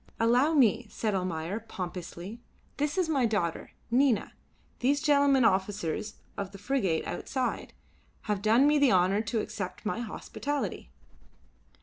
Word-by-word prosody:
"Allow 250 +7 +3
me," 235 -4 +4
said 215 -1 -2
Almayer, 180 +1 -2
pompously. 185 0 -7 0.4
"This 295 +4 -1
is 365 -3 +2
my 275 -7 +2
daughter. 185 -7 -2 0.2
Nina, 250 -3 +2 0.5
these 280 +3 +2
gentlemen, 280 -4 +4
officers 195 +1 0 0.2
of 195 -1 -4
the - - -8
frigate 200 -7 0
outside, 260 -2 -3 0.5
have 210 -2 -2
done 225 +6 +4
me 295 0 +4
the 280 -4 +5
honour 185 +2 +3
to 225 0 -1
accept 185 -1 -6
my 215 - -1
hospitality." 280 +5 -4
220 Hz, 130 wpm, -29 LUFS, 190-270 Hz, 0.5 s, the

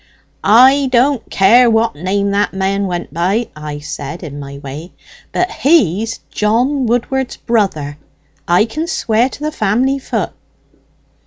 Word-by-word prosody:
'I 260 +6 +5
don't 250 0 +2
care 235 +6 +5
what 225 0 +2
name 200 +5 -1
that 205 +1 0
man 195 +1 0
went 175 -1 -5
by,' 190 +8 0
I 150 -1 -6
said, 145 +2 -7
in 145 -3 -7
my 140 0 -8
way, 145 +5 -9 0.4
'but 360 - 0
he's 225 - +1
John 245 +5 +1
Woodward's 245 +2 -1
brother; 155 -11 -1 0.5
I 175 +4 +4
can 310 +8 -4
swear 235 -4 +1
to - - -11
the 305 +1 -3
family 255 +3 0
voot.' - - -3
215 Hz, 140 wpm, -16 LUFS, 175-250 Hz, 0.5 s, I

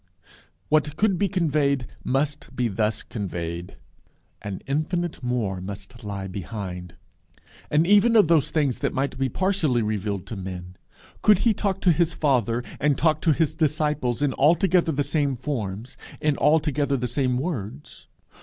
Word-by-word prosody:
What 155 0 +2
could 200 -2 +2
be 200 -1 +2
conveyed 145 -7 +1 0.2
must 140 +1 -2
be 125 -1 +1
thus 110 +2 -1
conveyed: 85 -5 -5 0.7
an 100 -2 -6
infinite 155 +5 -2
More 115 -7 -1
must 100 +5 -8
lie 100 -2 -4
behind. 90 -2 -6 0.7
And 150 +2 +3
even 205 +5 +5
of 210 -7 +6
those 160 -4 +3
things 145 -6 0
that - - -1
might 140 +1 -1
be 135 -1 +1
partially 165 - +1
revealed 105 -2 -2
to 115 - -6
men, 90 -1 -7 0.5
could 210 -2 +6
he 230 - +5
talk 195 -2 -2
to 180 - +5
his 170 0 +1
Father 125 -5 +1 0.2
and 145 -1 +2
talk 155 -1 +2
to 160 - +3
his 155 +1 +1
disciples 150 -5 0
in 140 -3 +1
altogether 170 +3 +3
the 145 -1 0
same 145 -1 0
forms, 120 -4 -4 0.2
in 150 -1 +1
altogether 150 -2 +2
the 125 0 -2
same 125 0 0
words? 115 - -5
135 Hz, 155 wpm, -24 LUFS, 105-155 Hz, 0.7 s, of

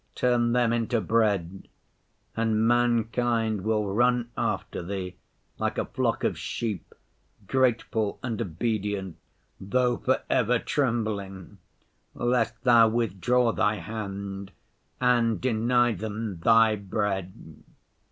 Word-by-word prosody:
Turn 120 -1 +2
them 120 -2 +2
into 115 0 0
bread, 100 -4 0 0.7
and 110 -1 +1
mankind 115 -2 +1
will 110 -1 +1
run 120 +4 +1
after - - -2
Thee 90 0 -5 0.4
like - - -1
a - - 0
flock - - -1
of - - 0
sheep, 105 -7 -4 0.5
grateful 115 -3 0
and 115 -4 -3
obedient, 100 0 -2 0.4
though 120 +5 +1
for 130 - 0
ever 125 0 +2
trembling, 110 - -2 0.6
lest 120 -1 0
Thou 120 -3 +6
withdraw 115 +2 +1
Thy 110 -1 +1
hand 100 -3 -6 0.5
and 120 -3 +2
deny 120 0 +2
them 105 -2 -5
Thy 115 +3 +5
bread." 95 -5 -4
110 Hz, 105 wpm, -26 LUFS, 100-120 Hz, 0.7 s, Thou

